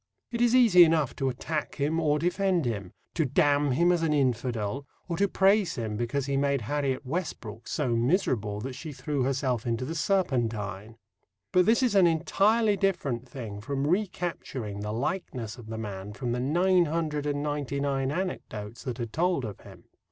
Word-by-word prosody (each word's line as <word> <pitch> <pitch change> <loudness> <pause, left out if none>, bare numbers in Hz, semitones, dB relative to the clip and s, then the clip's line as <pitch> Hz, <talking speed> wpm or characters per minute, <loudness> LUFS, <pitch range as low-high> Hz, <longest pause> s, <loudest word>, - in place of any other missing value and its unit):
It 235 0 -2
is 240 0 +4
easy 220 -9 +8
enough 160 -5 +2
to 135 -1 0
attack 150 +5 -3
him 150 +3 0
or 150 -2 +2
defend 180 0 +1
him 100 -6 -3 0.2
to 165 - +1
damn 145 +1 +2
him 170 +6 +4
as 175 -2 +1
an 160 -2 +1
infidel 125 -2 -1 0.2
or 170 - -2
to 200 - +3
praise 195 -1 +3
him 110 -4 -3
because 120 +5 -1
he 140 0 0
made 140 -1 +1
Harriet 135 +3 -1
Westbrook 130 - -5
so 145 -4 -1
miserable 115 - +1
that 130 +3 -5
she 150 +3 -7
threw 145 0 -2
herself 130 -3 0
into 115 +2 -1
the 160 - -4
Serpentine. 115 - -1 0.5
But 180 +1 +4
this 230 +4 +4
is 245 -4 +2
an 190 -3 +6
entirely 200 +7 +3
different 145 - -1
thing 110 -7 -7
from 135 +5 -2
recapturing 165 - -2
the 105 +1 -3
likeness 125 - -3
of 115 - -11
the 110 0 -5
man 100 -2 -6
from 120 +2 -3
the 120 - -1
nine 175 +7 +3
hundred 150 -2 -2
and 145 0 -1
ninety 145 -2 -2
nine 135 -1 0
anecdotes 115 - -4
that 125 -2 -4
are 120 - -1
told 160 +3 0
of 105 -3 -7
him. - - -14
140 Hz, 180 wpm, -28 LUFS, 120-170 Hz, 0.5 s, easy